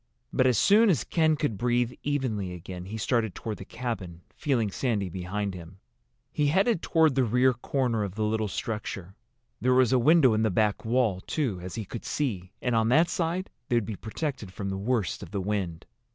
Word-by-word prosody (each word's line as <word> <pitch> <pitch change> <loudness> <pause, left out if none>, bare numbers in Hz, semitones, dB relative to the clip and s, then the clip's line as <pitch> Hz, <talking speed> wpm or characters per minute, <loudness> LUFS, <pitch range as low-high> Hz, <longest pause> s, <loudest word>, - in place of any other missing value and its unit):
But 130 - +4
as 125 - +3
soon 215 +2 +5
as 160 -9 +2
Ken 160 -2 +2
could 130 -9 -2
breathe 120 0 +1
evenly 120 -10 -1
again 90 +1 -8
he 105 +4 -6
started 110 -3 0
toward 110 -2 -5
the 95 - -9
cabin, 95 -10 -5
feeling 120 -9 0
Sandy 105 -5 -1
behind 95 +3 -3
him. 90 +1 -10 0.5
He 150 - +1
headed 190 +5 +2
toward 160 -3 +3
the 130 0 +2
rear 125 +3 +3
corner 120 -2 -1
of 100 -2 -5
the 110 - -1
little 110 0 0
structure. 100 -3 -4 0.5
There 125 +1 +3
was 130 -1 +4
a 130 - +5
window 140 -1 +5
in 110 - +1
the 110 - +2
back 105 +1 +1
wall, 115 -5 +1
too, 125 - -1
as 90 +1 -6
he 110 -3 -4
could 115 +4 -7
see, 95 -11 -2
and 125 - +1
on 110 0 +3
that 160 +7 +4
side 175 +3 -1 0.2
they 120 - +2
would 115 -3 +2
be 110 - -4
protected 110 - -4
from 100 +1 -4
the - - -2
worst 105 0 -1
of - - -8
the 100 - -3
wind. 95 -4 -2
115 Hz, 205 wpm, -27 LUFS, 100-130 Hz, 0.5 s, soon